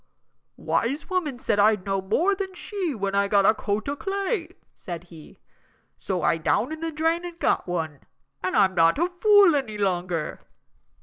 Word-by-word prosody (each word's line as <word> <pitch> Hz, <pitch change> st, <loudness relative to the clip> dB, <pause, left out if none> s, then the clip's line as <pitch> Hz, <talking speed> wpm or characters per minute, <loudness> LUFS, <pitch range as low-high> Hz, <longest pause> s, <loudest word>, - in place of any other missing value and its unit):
"Wise 280 Hz, +10 st, -2 dB
woman 320 Hz, -8 st, -1 dB
said 210 Hz, -4 st, 0 dB
I'd 210 Hz, -2 st, +3 dB
know 195 Hz, -1 st, -1 dB
more 315 Hz, -, +1 dB
than 380 Hz, -1 st, -5 dB
she 360 Hz, -5 st, -4 dB
when 200 Hz, -2 st, -2 dB
I 200 Hz, 0 st, +2 dB
got 200 Hz, -1 st, +3 dB
a -, -, +6 dB
coat 210 Hz, +1 st, -3 dB
o' 285 Hz, -, -1 dB
clay," 390 Hz, +1 st, -2 dB, 0.3 s
said 175 Hz, -4 st, -7 dB
he, 165 Hz, -3 st, -15 dB, 0.6 s
"so -, -, -3 dB
I -, -, +3 dB
down -, -, 0 dB
in 315 Hz, -, -5 dB
the 330 Hz, 0 st, -3 dB
drain 325 Hz, +3 st, 0 dB
and 350 Hz, -1 st, -7 dB
got -, -, 0 dB
one, 160 Hz, -5 st, -3 dB, 0.4 s
and 185 Hz, -, 0 dB
I'm 190 Hz, -2 st, +4 dB
not 165 Hz, +2 st, +4 dB
a 345 Hz, +4 st, 0 dB
fool 410 Hz, -5 st, +6 dB
any 250 Hz, -7 st, -2 dB
longer." 180 Hz, -5 st, -2 dB
230 Hz, 180 wpm, -25 LUFS, -, 0.6 s, a